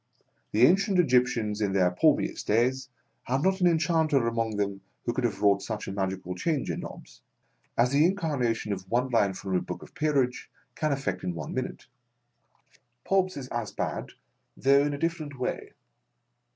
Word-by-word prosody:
The 110 +4 +5
ancient 195 - +3
Egyptians 125 -9 +2
in 100 -2 0
their 90 -2 +3
palmiest 90 - +1
days, 125 +5 +1 0.3
had 130 +3 -1
not 190 0 +2
an 180 - +5
enchanter 160 -5 +2
among 115 -2 -1
them 100 -1 -2 0.2
who 120 - 0
could 130 - -2
have 105 -3 -2
wrought 100 -1 +4
such 110 0 -5
a - - -3
magical 95 -2 -3
change 140 - -1
in - - -4
Nobbs, - - -10 0.6
as 120 +2 +3
the 145 +2 +4
incarnation 145 - 0
of 95 -1 -8
one 125 +3 +1
line 105 -5 +2
from 95 0 -5
the 90 - +2
book - - -6
of - - -13
the - - -36
Peerage 140 -5 0 0.2
can 155 -2 -1
effect 105 -10 -2
in 90 -2 -2
one 75 -3 -5
minute. 130 - -4 1.2
Pobbs 185 -2 +1
is 135 -2 -6
as 120 -3 -3
bad, - - -4 0.4
though 140 +1 +5
in 145 0 -1
a - - -6
different 155 -3 -3
way. 125 - -4
125 Hz, 180 wpm, -28 LUFS, 105-150 Hz, 1.2 s, The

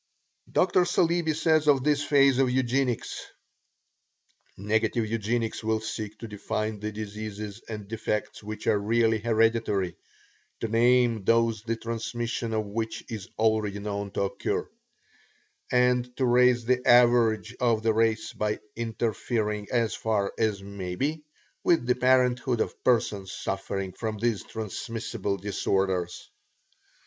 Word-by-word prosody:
Dr. 180 0 +3
Saleeby 170 -2 +1
says 155 -1 +2
of 140 -3 +4
this 145 0 +2
phase 140 -2 +4
of 135 -2 +3
Eugenics: 130 -1 0 1.3
"Negative 110 +3 0
Eugenics 115 +1 -2
will 110 0 +1
seek 110 -1 -5
to 115 - -8
define 110 0 -3
the 105 +1 -4
diseases 105 0 -6
and 105 -2 -6
defects 105 -1 -3
which 110 +1 -7
are 105 - +3
really 115 +1 +2
hereditary; 110 -4 +1 0.7
to 115 - -1
name 120 -1 +3
those 115 0 +2
the 115 +1 -2
transmission 115 0 -3
of 110 -1 0
which 110 +2 -4
is 105 -4 -6
already 110 -2 +1
known 100 0 -4
to 100 - -2
occur, 100 - -2 1.0
and 125 0 +2
to 130 - +1
raise 125 -1 +4
the 125 +1 +1
average 120 -2 +4
of 115 -3 +2
the 110 -1 +3
race 110 0 +1
by 105 0 -1 0.2
interfering 110 -2 -2
as 115 -3 +1
far 105 -3 -1
as 105 -3 0
may 95 -3 -5
be 150 +8 -1 0.4
with 165 -8 +3
the 125 - +3
parenthood 125 -1 +2
of - - -3
persons 105 -6 +1
suffering 95 0 -3
from 110 -2 -4
these 110 -3 0
transmissible 110 -1 -4
disorders. 95 -2 -1
115 Hz, 130 wpm, -27 LUFS, 105-120 Hz, 1.3 s, of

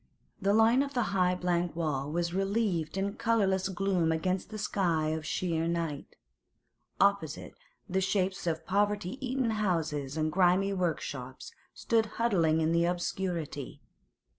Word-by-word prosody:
The 200 +1 +3
line 225 +4 +5
of 280 -1 -3
the 245 - +2
high 180 -1 +3
blank 175 -2 -1
wall 150 -4 -2
was 170 +1 -1
relieved 195 -4 0
in 200 +2 -2
colourless 195 -4 +1
gloom 185 -3 +1
against 185 +5 -1
a 215 - -5
sky 175 -7 0
of 160 0 -3
sheer 165 -1 -1
night. 165 -4 -3 0.8
Opposite, 200 -6 +1 0.3
the 190 -1 0
shapes 190 -1 0
of 160 -1 -1
poverty 205 +4 0
eaten 255 -2 0
houses 160 -9 -1
and 155 0 0
grimy 185 +3 +3
workshops 145 -8 -3 0.2
stood 225 -1 +1
huddling 170 -9 +2
in 160 +1 +2
the 170 0 +3
obscurity. 175 -5 -3
180 Hz, 140 wpm, -30 LUFS, 160-200 Hz, 0.8 s, line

